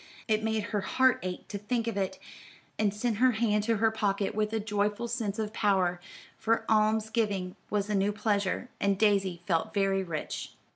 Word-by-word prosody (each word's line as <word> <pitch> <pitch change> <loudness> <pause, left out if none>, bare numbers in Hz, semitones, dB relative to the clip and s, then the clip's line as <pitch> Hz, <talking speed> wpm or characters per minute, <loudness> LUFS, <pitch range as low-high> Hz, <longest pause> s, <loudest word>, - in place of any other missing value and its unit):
It 215 -1 +2
made 220 -1 0
her 205 - +1
heart 260 +6 +3
ache 180 0 -5
to 200 - -4
think 230 +3 -1
of 230 -3 -2
it, 195 -2 -1 0.6
and 210 -2 +3
sent 215 +1 -1
her 255 +2 +4
hand 215 -2 +1
to 230 -1 +2
her 220 +1 +3
pocket 205 -2 0
with 210 0 0
a 225 - 0
joyful 210 +1 -1
sense 225 -4 -2
of 215 -1 -3
power; 190 -5 +2 0.4
for 225 +1 +1
alms 220 0 +2
giving 200 -5 -1
was 205 -1 0
a 210 - -2
new 200 +1 +2
pleasure, 205 +2 -1
and 200 -1 +2
Daisy 195 -4 +2
felt 165 0 0
very 195 -1 +2
rich. 165 -4 -5
210 Hz, 190 wpm, -29 LUFS, 195-220 Hz, 0.6 s, her